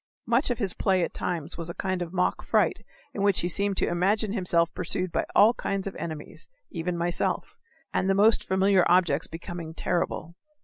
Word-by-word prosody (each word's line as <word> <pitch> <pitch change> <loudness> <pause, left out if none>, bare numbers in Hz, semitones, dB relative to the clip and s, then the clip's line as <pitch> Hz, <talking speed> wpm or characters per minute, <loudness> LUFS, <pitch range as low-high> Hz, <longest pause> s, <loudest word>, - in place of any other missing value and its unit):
Much 235 +5 +2
of 245 - 0
his 200 -6 0
play 190 -2 +1
at - - -3
times 170 -1 -4
was 170 0 -4
a 170 - -6
kind 185 -2 -2
of 170 -2 -4
mock 180 -1 0
fright - - +1 0.3
in 200 - -4
which 200 -2 +2
he 175 - -1
seemed 200 +2 0
to - - +2
imagine 200 +4 +1
himself 170 -5 +1
pursued 180 0 -1
by - - 0
all 215 +3 +7
kinds 195 -4 -3
of 195 - -5
enemies 155 -3 -7 0.2
even 175 0 -3
myself 170 0 -1 0.4
and 190 - +1
the 195 - +3
most 215 +3 +4
familiar 190 0 +3
objects 170 -4 +3
becoming 165 0 -7
terrible. 170 -2 -2
180 Hz, 190 wpm, -27 LUFS, 170-195 Hz, 0.4 s, all